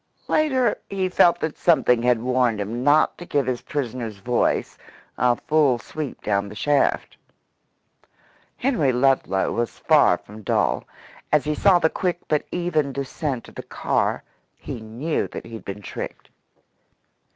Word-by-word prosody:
Later 260 -7 +2
he 190 -1 -1
felt 175 -1 +4
that 160 -1 -3
something 125 -8 +3
had 120 -1 +2
warned 125 -3 +1
him 115 +5 -3
not 145 +3 +3
to - - -7
give 140 -2 +1
his 125 -1 -2
prisoner's 120 -6 -4
voice 120 +5 0 0.4
a 125 0 +3
full 145 -2 +2
sweep 145 +5 -7
down 100 0 0
the 105 - -10
shaft. 145 +4 +1 1.4
Henry 235 - +1
Ludlow 125 -6 +1
was 120 0 -2
far 145 - +4
from 105 +4 -13
dull. - - 0 0.5
As 150 -1 +4
he 150 - 0
saw 185 +4 +5
the 160 - +3
quick 180 -2 -1
but 150 -1 0
even 170 -5 0
descent 135 -1 -4
of - - -14
the - - -6
car, - - -1 0.3
he - - -7
knew 120 +9 -2
that - - -8
he 115 - -11
had 115 - -8
been 100 +1 -7
tricked. - - -7
135 Hz, 150 wpm, -23 LUFS, 115-155 Hz, 1.4 s, saw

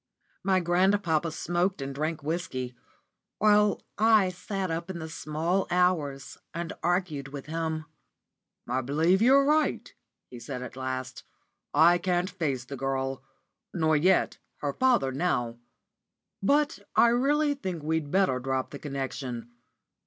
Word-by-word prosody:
My 190 -1 +3
grandpapa 175 -2 +2
smoked 175 +4 -1
and 135 0 -4
drank 155 +2 -3
whisky, 145 -6 -3 0.6
while 210 -1 +4 0.2
I 215 -3 +5
sat 185 0 -4
up 170 +2 -3
into 170 -3 -5
the 160 - -6
small 165 +4 -1
hours 170 -7 0 0.2
and 170 -1 -3
argued 175 -6 0
with 140 0 -8
him. 160 0 -3 0.8
"I 125 +2 0
believe 160 - +2
you're 270 +4 +6
right," 305 +1 +1 0.3
he 125 - -11
said 125 0 -6
at 125 - -8
last. 130 0 -4 0.5
"I 170 +4 +5
can't 180 +1 0
face 140 -9 -2
the 140 - -7
girl, 135 0 -2 0.5
nor 160 -2 +2
yet 180 +5 +2 0.2
her 145 -1 -1
father 245 - +2
now; 125 -6 -1 0.8
but 290 +8 +2 0.2
I 235 - +6
really 290 +5 +2
think 185 - -5
we'd 160 -1 -1
better 185 -7 +2
drop 130 0 -2
the 140 - -7
connection. 130 -4 -5
165 Hz, 135 wpm, -28 LUFS, 135-190 Hz, 0.8 s, you're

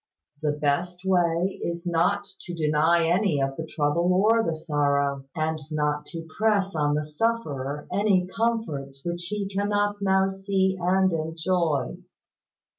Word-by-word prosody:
The 150 -1 +1
best 175 +5 -1
way 175 0 +1
is 170 0 -3
not 180 +4 +1 0.2
to 175 - -7
deny 160 +2 +3
any 175 -3 +2
of 135 0 -1
the 160 +1 -5
trouble 160 +4 +1
or 215 +5 +4
the 165 -7 -1
sorrow, 140 -3 0
and 160 0 -1
not 150 -1 -1
to 165 -1 -7
press 205 -3 +2
on 145 -1 +1
the 150 - 0
sufferer 150 -6 -2
any 200 -3 +3
comforts 180 -11 -2
which 175 0 -3
he 205 +2 -3
cannot 205 +1 0
now 190 -1 +3
see 195 0 0
and 185 +1 +3
enjoy. 160 -3 -1
170 Hz, 140 wpm, -26 LUFS, 150-195 Hz, 0.2 s, or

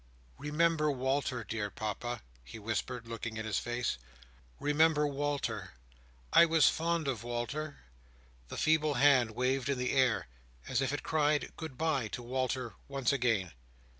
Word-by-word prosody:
"Remember 155 +1 +2
Walter, 130 -2 0
dear 105 0 -3
Papa," 110 +4 -4 0.2
he 65 - -10
whispered, 115 +2 -3
looking 115 0 -5
in 110 - -3
his 110 -3 0
face. 120 - -2 0.6
"Remember 150 +1 +3
Walter. 140 - -2 0.6
I - - +9
was 160 -1 +5
fond 165 -1 +1
of 120 -5 -2
Walter!" 120 +6 -4 0.7
The - - -7
feeble 155 -2 +3
hand 130 -3 +5
waved 130 +1 0
in 140 - +1
the 125 0 0
air, 130 -4 +3 0.4
as - - +1
if 135 - 0
it 145 - -3
cried 150 -1 +1
"good 160 -6 -7
bye!" 155 -8 +1
to 120 - -4
Walter 130 -1 -2
once 135 -2 0
again. 115 -9 +1
130 Hz, 145 wpm, -32 LUFS, 120-150 Hz, 0.7 s, I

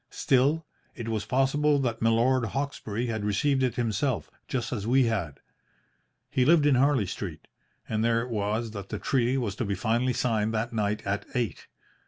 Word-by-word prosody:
Still, 140 +5 +2 0.3
it 115 -2 -5
was 110 -2 -2
possible 145 +4 +2
that 120 -5 -1
Milord 115 +3 +3
Hawkesbury 120 -2 -3
had 110 -3 -3
received 130 +7 +1
it 125 -2 +1
himself 120 +2 -1 0.2
just 130 -1 -2
as 105 -3 -3
we 130 +2 +4
had. 95 - -2 0.9
He 130 - +2
lived 155 +2 +5
in 145 - +5
Harley 130 -3 +3
Street, 90 -3 -6 0.4
and 110 0 -1
there 115 0 +2
it 125 - -7
was 110 +1 -1
that 100 -3 -7
the - - -3
treaty 130 0 +1
was 110 -6 -2
to - - -1
be 100 -1 -1
finally 120 +5 +1
signed 110 -2 0
that 115 +2 -2
night 105 -1 -1
at 100 +1 -2
eight. 120 -4 -2
115 Hz, 180 wpm, -27 LUFS, 105-130 Hz, 0.9 s, lived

